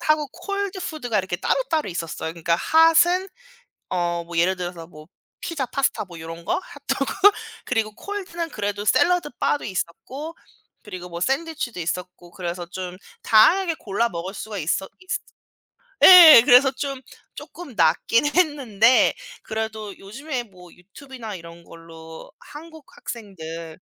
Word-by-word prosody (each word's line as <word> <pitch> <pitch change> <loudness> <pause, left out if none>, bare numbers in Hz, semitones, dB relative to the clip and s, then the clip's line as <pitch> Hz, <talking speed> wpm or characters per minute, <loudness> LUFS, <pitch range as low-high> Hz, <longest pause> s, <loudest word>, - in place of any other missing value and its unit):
핫하고 305 -2 +1
콜드 400 +2 -4
푸드가 245 -11 -3
이렇게 185 -2 -2
따로따로 320 - -1
있었어요. 165 -2 -5
그러니까 170 0 0
핫은 335 - +4 0.6
어 175 -1 -1
뭐 170 0 -7
예를 185 +3 +2
들어서 175 -2 -7
뭐 155 -3 -15 0.3
피자 300 -6 -3
파스타 270 -3 -1
뭐 170 -3 -12
요런 165 +1 -9
거? - - 0
핫도그? 280 -1 -4 0.5
그리고 225 -3 -1
콜드는 360 -5 -5
그래도 205 -4 -4
샐러드 350 - +2
바도 290 - 0
있었고 260 - -5 0.5
그리고 185 -4 -9
뭐 170 0 -6
샌드위치도 270 - -2
있었고 175 +1 -5
그래서 175 -1 -5
좀 180 0 -7 0.3
다양하게 330 - +4
골라 225 +3 -1
먹을 175 +2 -6
수가 210 0 -7
있었 175 +3 -2
있으 370 0 -3 0.8
예. 340 -9 +11
그래서 265 0 +6
좀 275 0 -5 0.4
쪼끔 340 -8 -10
낫긴 175 - +2
했는데 275 - +3 0.3
그래도 220 -2 -5
요즘에 255 +6 -6
뭐 180 -5 -17
유튜브나 225 +3 -10
이런 170 0 -12
걸로 165 -1 -13
한국 315 0 -13
학생들 165 -7 -8
215 Hz, 310 characters per minute, -23 LUFS, 175-295 Hz, 0.8 s, 예